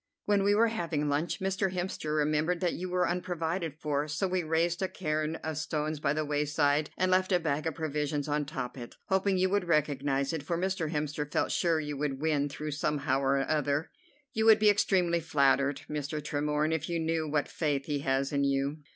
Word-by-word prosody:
"When 205 -1 +3
we 200 +1 +3
were 230 +2 +4
having 165 -8 -1
lunch 150 +4 -1
Mr. 190 0 0
Hemster 155 -4 -2
remembered 155 +3 +1
that 175 -1 0
you 185 +1 -4
were 180 0 +1
unprovided 175 -2 -2
for, 150 -1 -1
so 155 +6 -1
we 185 0 0
raised 165 +2 0
a 190 - +1
cairn 155 -3 -2
of 155 -1 -3
stones 155 -1 -2
by 145 -1 +1
the 155 0 -1
wayside 145 0 +1
and 185 0 +1
left 185 +1 +2
a 180 - +4
bag 155 -2 -1
of 160 - -2
provisions 150 -2 -2
on 150 0 0
top 135 -3 -5
of - - -7
it, 120 - -9
hoping 190 0 +2
you 185 0 +2
would 200 -2 +1
recognize 140 -3 +1
it, 160 - -2
for 165 +4 -2
Mr. 185 -3 -1
Hemster 150 -1 -2
felt - - 0
sure 165 -2 +2
you 150 -2 -4
would 135 -2 -2
win 145 -2 +1
through 150 +2 -5
somehow 140 -2 0
or 135 0 +1
other. 150 0 0 0.4
You 220 -3 +1
would 220 -1 +8
be 210 -1 +5
extremely 180 -4 +2
flattered, 140 -3 +2
Mr. 150 0 -3
Tremorne, 150 +1 0
if 160 0 -2
you 170 -1 -1
knew 160 -1 -1
what 145 -1 0
faith 145 -4 -1
he 145 -2 -1
has 135 0 0
in 140 0 +2
you." 140 +1 0
155 Hz, 210 wpm, -30 LUFS, 145-175 Hz, 0.4 s, would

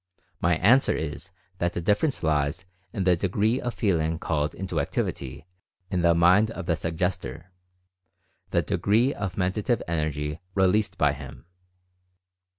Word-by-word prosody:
My 85 0 +3
answer 115 +11 +4
is 75 -1 -5 0.3
that 85 0 0
the - - -2
difference 105 - +1
lies 80 +3 0 0.3
in 100 -3 -2
the 90 -1 +4
degree 105 +7 0
of 120 -1 -3
Feeling 80 -7 +1
called 75 -2 -1
into 95 -4 -3
activity 70 0 -3 0.5
in 90 -2 +1
the 85 -1 +4
mind 90 +6 +5
of 95 -5 -6
the 85 - +1
Suggestor 85 -1 -3 0.5
— 90 -3 -46
the - - +1
degree 115 +7 +2
of 95 -3 -4
Mentative 100 +6 0
Energy 75 -1 -2 0.2
released 100 +2 +2
by 75 -1 +3
him. 65 -2 -10
85 Hz, 145 wpm, -26 LUFS, 80-100 Hz, 0.5 s, mind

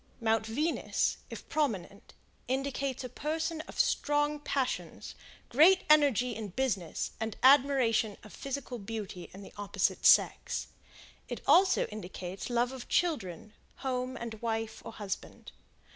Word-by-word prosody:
Mount 225 -1 +1
Venus, 300 +9 0
if - - -9
prominent, 215 - -2 0.3
indicates 270 0 -2
a - - -3
person 315 +5 -3
of - - -9
strong 295 0 +2
passions, 270 -3 -3 0.3
great 335 +9 +6
energy 270 -5 +4
in 220 -1 -5
business, 200 -5 -2
and 220 -1 -3
admiration 260 -6 +4
of 215 - -13
physical 275 -3 -5
beauty 200 -4 -6
in 195 +2 -11
the - - -12
opposite 205 -1 -1
sex; - - +3 0.6
it - - -5
also 375 0 +5
indicates 190 -2 -6
love 240 +1 +1
of 260 -2 -9
children, 215 - -1 0.3
home 255 0 -2
and 225 -2 -7
wife, 225 -1 -3
or - - -8
husband. 200 -2 -6
245 Hz, 130 wpm, -31 LUFS, 215-280 Hz, 0.6 s, great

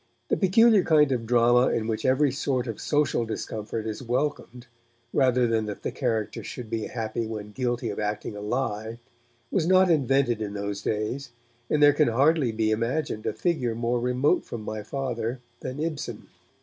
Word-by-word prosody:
The - - +3
peculiar 215 +2 +5
kind 150 -4 +4
of 120 -3 -1
drama 120 +1 +4
in 110 - 0
which 110 -1 -2
every 130 +2 +3
sort 135 -2 -1
of 115 -4 -5
social 145 -5 +1
discomfort 110 0 -4
is 110 +1 -4
welcomed 125 -1 -2 0.5
rather 125 -2 +3
than 110 -2 0
that 105 - -6
the - - -2
characters 115 -5 -2
should 120 -4 -7
be 110 -2 -2
happy 115 -1 -3
when 105 -2 -6
guilty 120 -1 -2
of - - -6
'acting 105 0 -3
a 105 - -7
lie', 110 0 -2 0.5
was 170 -4 +1
not 185 0 +5
invented 135 -6 +2
in 105 -1 -4
those 100 0 -3
days, 110 +6 -2 0.4
and 150 -1 +3
there 145 0 +7
can 150 +1 +3
hardly 135 +2 +3
be 110 0 0
imagined 115 +1 -1
a - - 0
figure 135 -10 -1
more 120 +1 0
remote 125 +7 +1
from 115 -2 -7
my 110 0 -4
Father 120 0 -3 0.2
than 130 +2 -6
Ibsen. 155 -2 -4
120 Hz, 175 wpm, -26 LUFS, 110-140 Hz, 0.5 s, there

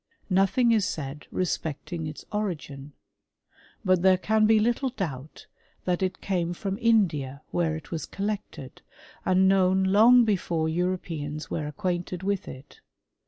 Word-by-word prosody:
Nothing 195 +6 +3
is 220 -3 +3
said 150 -3 -5
respecting 160 -2 -3
ita 150 - -8
origin; 150 -9 -4 0.9
but 185 -2 +3
there 190 0 +5
can 215 +3 +2
be 220 0 +5
little 240 +4 +1
doubt 155 - -6 0.4
that 180 0 0
it 185 0 -2
cam6 175 -3 -1
from 195 +2 -4
India, 155 - +1
where 165 -2 0
it 160 - -9
was 165 -2 -4
collected, 200 -10 -5 0.5
and 185 0 +4
known 190 0 +3
loitg 230 +5 +6
before 175 -6 0
Europeans 160 -3 -3
were 150 -2 -2
acquainted 180 +1 -3
with 200 -1 -1
it. 130 +2 -11
185 Hz, 135 wpm, -26 LUFS, 155-200 Hz, 0.9 s, loitg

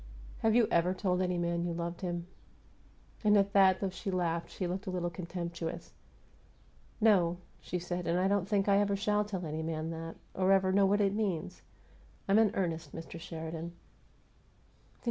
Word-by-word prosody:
"Have 220 0 +2
you 235 -3 +5
ever 175 +2 +3
told 185 -1 0
any 180 -1 0
man 170 0 0
you 175 -1 -2
loved 170 0 -4
him?" 175 -2 -3 1.0
And 210 -1 +5
at 200 0 +2
that, 190 -2 +6
though 195 -2 -1
she 190 +2 -5
laughed, 170 -3 -1
she 185 - -4
looked 185 +3 -4
a - - 0
little 175 -1 -2
contemptuous. 170 -1 -5 1.1
"No," 185 -6 +4 0.2
she 180 - -4
said. 175 0 -4
"And 170 +1 +2
I 185 - +3
don't 200 -1 +1
think 200 -2 +2
I 200 0 +5
ever 200 -1 +2
shall 210 +1 +1
tell 190 -4 -4
any 155 0 -3
man 160 0 -3
that 165 0 -6 0.2
or 190 0 +2
ever 190 -1 +3
know 195 0 +4
what 205 +2 +3
it 200 -1 +2
means. 185 -5 -2 0.7
I'm 200 +2 +5
in 220 -2 +5
earnest, 165 -5 -2
Mr. 165 0 -7
Sheridan." 165 +1 -6
180 Hz, 180 wpm, -32 LUFS, 170-195 Hz, 1.1 s, that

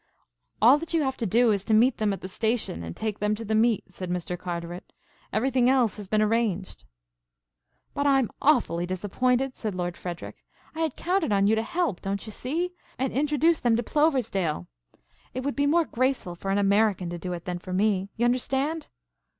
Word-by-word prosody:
"All 260 +6 +7
that 330 +1 -4
you 320 - +3
have 265 -1 -1
to 230 - -1
do 230 +4 +4
is 200 -2 0
to 220 - +3
meet 240 +3 +4
them 215 -2 +1
at 195 - -4
the - - -5
station 220 - -1
and 85 0 -7
take 215 -2 -3
them 210 +1 +1
to 225 +2 -7
the 220 - -1
meet," 220 -4 +2
said 185 -1 -6
Mr. 180 0 -2
Carteret. 175 0 -6 0.4
"Everything 250 +3 +2
else 250 -7 +2
has 205 -2 -8
been 215 +2 +2
arranged." 210 - -1 1.1
"But 285 0 0
I'm 270 -4 +3
awfully 235 - +2
disappointed," 250 +8 0
said 215 -4 -4
Lord 175 -1 -3
Frederic. 175 -2 -7 0.3
"I 320 - -8
had 320 -4 0
counted 360 - 0
on 200 -1 +3
you 210 - +4
to 220 - +2
help, 335 - -1
don't 195 +2 -3
you 215 - -7
see, 330 - -2 0.2
and 265 0 -1
introduce 300 +4 +2
them 235 -2 +2
to 235 - 0
Ploversdale. 225 - +1 0.7
It 255 - -2
would 280 +1 -2
be 285 0 +2
more 330 +3 +3
graceful 255 -8 -1
for 185 +3 -6
an 195 - +2
American 200 -3 +2
to 175 - -5
do 180 +1 -5
it 170 0 -7
than 180 -2 -3
for 185 - -9
me. 195 0 +1
You 235 - +2
understand?" 270 +5 0
220 Hz, 200 wpm, -26 LUFS, 190-265 Hz, 1.1 s, All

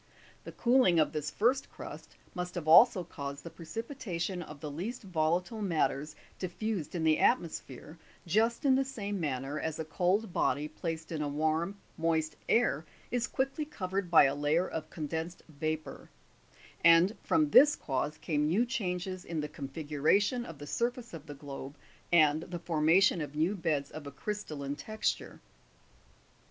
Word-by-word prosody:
The - - -7
cooling 235 -9 +4
of 155 - +3
this 150 -1 -3
first 250 - +1
crust - - -10 0.2
must 180 0 -4
have 170 -3 -4
also 185 +3 +7
caused 140 -4 -7
the 170 - -8
precipitation 190 - -4
of 150 -3 -9
the 150 -1 -6
least 205 - -5
volatile 180 +4 0
matters 155 -6 0 0.2
diffused 185 -2 -3
in 165 - -1
the 155 -1 +4
atmo 205 -9 +3
sphere, 150 +5 -9 0.3
just 225 - +1
in 270 - +6
the 270 +1 +3
same 205 -7 -4
manner 140 -1 -2
as 160 -1 -3
a 160 - -4
cold 180 +5 0
body 145 +4 +1
placed 165 0 -5
in 160 -2 -2
a 150 - -1
warm 160 +5 0 0.2
moist 160 -2 0
air 225 -10 +3 0.3
is 245 0 0
quickly 270 +3 -1
covered 195 - -3
by 170 - +8
a 135 -1 +3
layer 150 +5 +1
of 155 -1 -5
condensed 160 +2 -4
vapour; 155 0 -4 0.7
and 170 +5 +6
from 310 -2 +2
this 295 +1 +8
cause 145 +2 -2
came 150 -2 0
new 200 +10 +2
changes 185 -6 -3
in 165 -2 -4
the 150 - -2
configuration 155 - 0
of 165 - -9
the 145 - -8
sur 235 +10 +1
face 245 -4 -12
of 160 -2 -9
the 145 - -7
globe, 140 0 -8 0.3
and 155 -2 +5
the 175 +1 -6
formation 165 +2 +3
of 150 -1 -6
new 160 +6 +2
beds 160 -7 -1
of 150 -2 -8
a - - -6
crystalline 145 -4 -4
texture. 215 +7 -3
165 Hz, 165 wpm, -31 LUFS, 150-205 Hz, 0.7 s, by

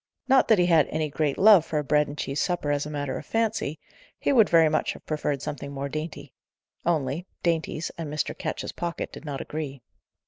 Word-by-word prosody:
Not 265 0 +5
that 220 - +5
he 180 - +4
had 165 -4 +4
any 155 -1 -2
great 150 -2 0
love 200 -4 +7
for 160 -1 -3
a 150 - 0
bread 150 +1 +2
and 145 - -8
cheese 140 0 -2
supper 175 -5 0
as 145 0 0
a - - -6
matter 145 -3 -3
of - - -11
fancy: 220 -9 -1 0.4
he - - +1
would 225 -5 +5
very 165 -1 +6
much 155 0 0
have - - -14
preferred 150 -3 -2
something 140 -1 -5
more 140 0 -4
dainty; 155 +2 -6 0.5
only, 160 +1 0 0.2
dainties 165 -1 -1
and 155 -3 -4
Mr. 150 0 -2
Ketch's - - -4
pocket 170 0 -4
did - - -10
not 140 -2 -4
agree. 140 -5 -5
155 Hz, 210 wpm, -26 LUFS, 145-170 Hz, 0.5 s, love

